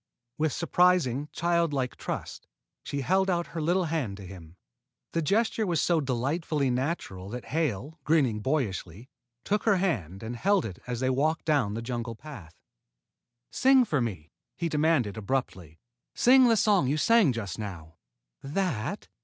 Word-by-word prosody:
With 155 -1 +1
surprising, 170 -6 +2
childlike 165 -7 0
trust, - - -6 0.4
she 140 - -3
held 190 +7 +2
out 175 -1 +1
her 165 - -3
little 175 +4 +2
hand 150 -12 -2
to 100 - -10
him. 90 -3 -12 0.6
The 165 - 0
gesture 215 +5 +1
was 170 -3 +1
so 170 -3 +2
delightfully 140 +2 -1
natural 125 - -3
that 125 +2 -6
Hale, 155 - -2
grinning 135 -9 +2
boyishly, 110 - -3 0.3
took 210 +1 -1
her 210 -4 +4
hand 105 - -2
and 115 +2 -5
held 195 - +2
it 95 -5 -7
as 125 -1 -3
they 130 0 +2
walked 155 +5 0
down 140 -10 +1
the 115 - -4
jungle 115 -1 -4
path. 105 - -11 1.0
"Sing 265 -1 +5
for 150 - 0
me," 90 -10 -4 0.3
he 170 - -1
demanded 150 -9 +1
abruptly. 100 - -3 0.4
"Sing 255 +1 +6
the 225 - +4
song 200 -10 +3
you 145 +4 +1
sang 225 - +4
just 100 -7 -5
now." 85 -7 -7 0.4
"That?" 155 - -2
140 Hz, 155 wpm, -28 LUFS, 110-170 Hz, 1.0 s, Sing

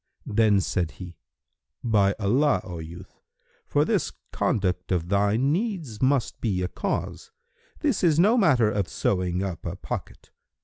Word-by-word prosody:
Then 105 -2 +3
said 85 -2 -1
he, 90 -2 -10 0.6
"By 100 -4 +3
Allah, 110 +1 +2
O 90 -2 -7
youth, 85 +4 -11 0.5
for - - +2
this - - 0 0.2
conduct 90 -3 -1
of 85 -2 0
thine 105 +7 +2
needs 170 - -2
must 130 -2 +1
be 95 -6 0
a - - 0
cause, 460 - -4 0.5
this 285 -11 0
is 160 -4 +4
no 205 +8 +5
matter 135 - +4
of 100 -3 -1
sewing 90 -1 -1
up 95 -4 -5
a - - -4
pocket. - - -7
105 Hz, 145 wpm, -25 LUFS, 90-140 Hz, 0.6 s, no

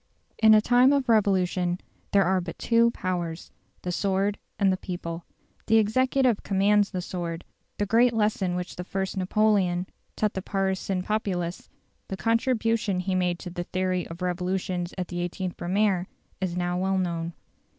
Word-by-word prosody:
In 220 -1 +7
a 215 - +6
time 245 +4 +5
of 275 -2 +1
revolution 185 -5 +2 0.3
there 200 -1 +5
are 185 +1 +2
but 175 -1 -7
two 235 0 +3
powers, 175 -6 -4 0.3
the 180 - -2
sword 195 +2 0 0.2
and 195 -2 +3
the - - -1
people. 170 -2 -6 0.4
The 225 - +5
executive 255 +2 +2
commands 205 +1 +3
the 185 -3 -4
sword; 170 -2 -5 0.3
the 205 - 0
great 235 +4 +4
lesson 210 -5 0
which 180 0 -5
the 180 - -4
First 190 +1 -3
Napoleon 190 -2 +2 0.3
taught 215 -1 0
the 190 - -3
Parisian 190 -1 -1
populace 185 -5 -2 0.4
the 190 - -5
contribution 225 -3 +1
he 185 +1 -1
made 180 -1 +1
to 180 - -8
the 175 0 -4
theory 185 -1 -1
of 170 +2 -8
revolutions 180 0 -2
at 180 -2 -2
the 175 - -5
18th 185 0 -5
Brumaire 190 0 +1 0.3
is 180 -2 -2
now 175 0 -1
well 190 +1 +1
known. 170 -2 -2
190 Hz, 160 wpm, -26 LUFS, 180-210 Hz, 0.4 s, In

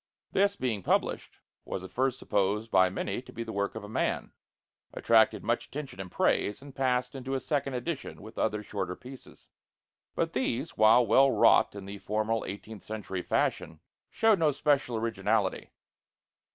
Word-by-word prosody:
This, 200 +1 +2
being 120 - -2
published, - - -1 0.3
was 95 - -5
at 95 - -9
first 130 0 0
supposed 105 0 0
by 95 -1 +5
many 95 +4 -3
to - - -14
be 115 - -5
the 110 -1 -7
work 100 +1 -1
of 110 - -6
a - - -7
man, 110 - -2 0.6
attracted - - +3
much - - -1
attention 135 -6 -7
and 90 -2 -9
praise, 105 - +1
and 140 0 -12
passed 125 -2 0
into 135 0 -4
a - - 0
second 140 -1 -1
edition 145 +3 -4
with 110 +1 -11
other 105 -1 0
shorter 95 -3 -4
pieces. 130 +4 -13 0.7
But 165 0 -1
these, 130 +3 -2
while 110 +3 +6
well 135 +5 +5
wrought 130 - +4
in 100 -1 -7
the 100 +1 -7
formal 110 +2 -1
eighteenth 105 +1 -8
century 100 -2 -5
fashion, 80 -2 -1 0.3
showed 225 -4 +3
no 155 -2 +4
special 140 -4 +1
originality. 115 0 0
115 Hz, 165 wpm, -29 LUFS, 100-135 Hz, 0.7 s, while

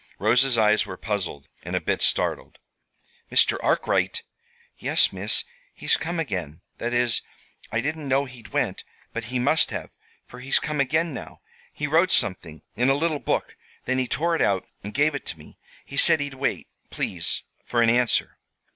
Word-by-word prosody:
Rosa's 120 +4 +3
eyes 110 -1 +4
were 95 -1 -7
puzzled, 90 -10 -4
and - - -5
a - - +2
bit - - -1
startled. - - +1 0.7
"Mr. - - +4
Arkwright!" - - +1 0.5
"Yes, - - +2
Miss. 95 +3 +1 0.3
He's - - +2
come 170 +1 -3
again. 90 - -4 0.2
That 120 - -2
is, 120 -3 +3 0.5
I 115 - 0
didn't 150 +2 -3
know 135 +1 +2
he'd 125 -4 -12
went - - -2 0.3
but 115 -1 -4
he 125 +3 -3
must 140 +6 +3
have, - - -5 0.3
for 125 - -12
he's 135 +2 +2
come 150 -1 -3
again 155 +4 +1
now. - - -9 0.3
He 150 - -4
wrote 165 +5 +3
something 80 -5 0
in 125 +4 +2
a 135 - +4
little 155 0 0
book; - - -2 0.3
then 130 0 0
he 130 - 0
tore 165 +6 0
it - - -1
out 95 -2 +2 0.2
and 105 - -6
gave 145 +6 +2
it 140 - -4
to 80 - -6
me. 75 - -16 0.3
He 140 - -8
said 155 - +6
he'd 145 -1 -3
wait, 135 +1 -2 0.2
please, - - -2 0.2
for 120 -1 +1
an 115 - +4
answer." 120 0 +1
125 Hz, 180 wpm, -25 LUFS, 110-145 Hz, 0.7 s, said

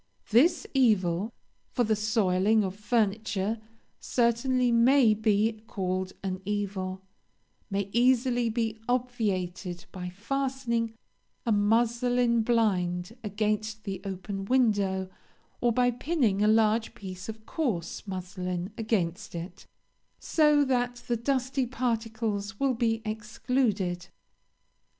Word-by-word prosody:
This 325 - +4
evil 210 -6 +2 0.4
for 245 - +1
the 220 -1 +2
soiling 210 -1 +2
of 190 -1 -3
furniture 210 0 0 0.4
certainly 245 +1 +2
may 235 0 +5
be 215 +1 +1
called 185 -1 -2
an 185 -1 -3
evil 190 -2 -3 0.7
may 200 -1 -1
easily 245 0 +3
be 225 -1 -2
obviated 195 -8 -2
by 180 -1 -5
fastening 235 +2 -2 0.5
a 230 - +1
muslin 235 +3 +2
blind 195 -4 +1
against 215 +1 -1
the 195 -2 -5
open 195 0 -5
window, 200 -6 +2 0.5
or 240 - +3
by 245 +1 +3
pinning 245 - 0
a 210 - +4
large 220 +1 +3
piece 185 +1 -8
of 220 0 -8
coarse 215 - -3
muslin 180 0 -4
against 205 -4 -1
it, 170 +2 -7 0.5
so 300 -2 +3
that 245 -2 -1
the 240 - +1
dusty 260 +2 0
particles 225 -4 -2
will 275 -1 +2
be 225 -1 0
excluded. 215 -4 -1
220 Hz, 110 wpm, -28 LUFS, 195-240 Hz, 0.7 s, may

